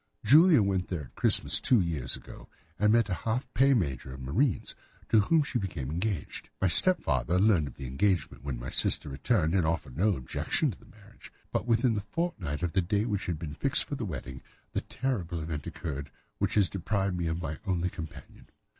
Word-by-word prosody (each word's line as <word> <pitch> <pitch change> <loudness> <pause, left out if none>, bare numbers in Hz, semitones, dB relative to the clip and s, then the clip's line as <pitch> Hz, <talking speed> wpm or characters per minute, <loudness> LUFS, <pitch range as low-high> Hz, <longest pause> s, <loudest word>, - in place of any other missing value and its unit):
Julia 155 - +7
went 95 -2 0
there 85 -5 -4
at - - -15
Christmas - - +4
two 125 - +4
years 85 -7 0
ago, - - -12 0.3
and 105 0 +4
met 115 0 +4
there 95 -4 -3
a - - -12
half 120 +4 -2
pay 135 +1 +4
major 70 - -2
of 65 - -10
marines, 100 - 0 0.4
to 110 - +5
whom 155 +9 +3
she 125 -3 -2
became 85 - -4
engaged. 90 0 -3
My 95 - +2
stepfather 85 - +3
learned 95 -7 +3
of 70 - -10
the 70 - -8
engagement 70 -1 0
when 70 -3 -3
my 60 +2 -6
sister - - +1
returned 80 - 0
and 95 -3 +3
offered 80 -5 -2
no 100 +2 +3
objection 65 - -1
to - - -12
the - - -19
marriage; - - -17 0.2
but - - -2
within 115 0 +3
a - - -1
fortnight 100 - -3
of 85 - -1
the 95 - +3
day 100 +4 0
which 105 -4 -2
had 85 -3 -1
been 75 -2 -6
fixed 135 - +2
for - - -8
the 135 - -3
wedding, 65 -7 -6 0.3
the - - -1
terrible 90 -11 -3
event 80 -2 -5
occurred 70 -3 -5 0.3
which - - 0
has 100 -3 +4
deprived 95 0 -1
me 85 -1 -2
of 80 +1 -2
my 80 -3 -5
only 90 -1 0
companion." 80 -3 -10
90 Hz, 210 wpm, -29 LUFS, 75-110 Hz, 0.4 s, Julia